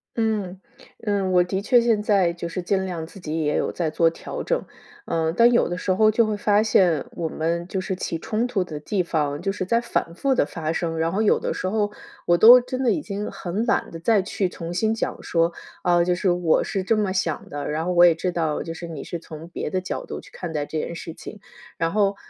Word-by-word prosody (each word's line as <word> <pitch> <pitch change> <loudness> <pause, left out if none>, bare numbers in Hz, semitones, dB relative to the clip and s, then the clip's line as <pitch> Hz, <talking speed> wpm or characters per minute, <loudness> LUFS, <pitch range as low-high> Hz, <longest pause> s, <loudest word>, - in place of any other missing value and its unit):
嗯， 210 -5 -1 0.5
嗯， 200 -2 0
我 180 -1 +5
的 190 +2 -2
确 245 +4 +4
现 230 -3 +2
在， 195 -5 +2
就 170 0 -5
是 185 - -4
尽 190 +1 0
量 170 -3 -4
自 195 +4 -13
己 160 -2 -3
也 150 - 0
有 - - 0
在 170 -3 -1
做 165 +1 +3
调 165 - -7
整。 - - -1 0.4
嗯， 160 0 0
但 235 +1 +6
有 240 - +3
的 175 - -3
时 185 - -1
候 215 +3 +4
就 230 +2 +3
会 215 -1 -1
发 205 0 +3
现 180 -9 +3
我 165 -2 -3
们， 170 +2 -2
就 190 - -3
是 190 0 -3
起 165 - -3
冲 220 +6 -1
突 205 -6 0
的 155 -4 -7
地 185 +6 -1
方， 150 -4 -1
就 195 - 0
是 190 -1 -4
在 230 +5 +2
反 170 -7 -2
复 270 +8 +1
地 - - +3
发 160 0 -4
生， 165 -2 -2
然 165 +1 +1
后 205 +3 0
有 215 - +3
的 - - -2
时 185 - -3
候 210 +1 0 0.3
我 175 - +4
都 240 +5 +10
真 255 +1 -4
的 240 - +3
已 310 - 0
经 205 -5 -4
很 195 +6 -3
懒 - - +1
得 165 - -7
再 205 +3 +3
去 190 -1 -2
重 170 0 -6
新 220 +4 +1
讲 - - -3
说， 165 0 +1 0.3
啊， 175 -1 +4
就 180 +1 +1
是 185 +2 0
我 175 -2 +2
是 195 -2 -2
这 225 - +2
么 205 -3 0
想 175 -5 -2
的， 145 0 -4
然 160 +2 -2
后 180 - 0
我 175 - +6
也 170 - +6
知 180 +2 -2
道 160 -3 -1
就 165 - -5
是 170 +1 -7
你 155 -4 -7
是 170 - -5
从 160 0 -10
别 160 - -4
的 185 - -1
角 185 - -4
度 - - -6
去 - - -16
看 175 -3 -6
待 150 -2 -1
这 155 - -3
件 170 - -4
事 165 - -7
情。 210 - -10 0.4
然 165 0 0
后 200 0 +2
180 Hz, 270 characters per minute, -23 LUFS, 165-210 Hz, 0.5 s, 都